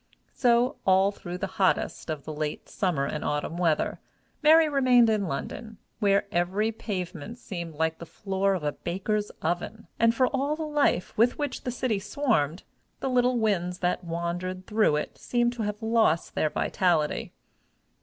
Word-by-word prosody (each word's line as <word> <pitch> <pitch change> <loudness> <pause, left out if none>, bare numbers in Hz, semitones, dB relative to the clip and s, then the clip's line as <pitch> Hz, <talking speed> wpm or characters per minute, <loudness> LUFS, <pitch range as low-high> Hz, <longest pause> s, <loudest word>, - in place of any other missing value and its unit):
So, 245 0 +3
all 190 +1 +4
through 175 -3 -7
the 190 - -2 0.2
hottest 185 - +1
of 155 -3 -4
the 155 - -5
late 150 0 -4
summer 175 -10 0
and 150 - -3
autumn 150 +2 -2
weather, 165 -4 +1 0.4
Mary 315 +1 +7
remained 255 -5 +4
in 205 -3 0
London, 220 +9 -5 0.2
where 200 -2 +3
every 190 +5 +1
pavement 195 -1 -5
seemed 170 -8 -6
like 160 +1 -1
the 170 - -8
floor 195 +3 -1
of 175 - -4
a 150 - 0
baker's 205 +6 -2
oven, 175 +7 -2
and, 230 0 +4
for 255 - +4
all 275 +3 0
the 320 - -4
life 295 - +1
with 240 +2 +4
which 290 -3 -3
the - - -1
city 240 -4 -1
swarmed, 195 - 0 0.4
the 265 - -2
little 250 0 +3
winds 180 -5 0
that 180 0 -1
wandered 175 +2 -3
through 210 -8 +2
it 150 - -4
seemed 240 0 +1
to 240 - -5
have 210 +1 -3
lost 220 -8 +2
their 155 - +1
vitality. 160 -2 0
195 Hz, 165 wpm, -27 LUFS, 170-235 Hz, 0.4 s, Mary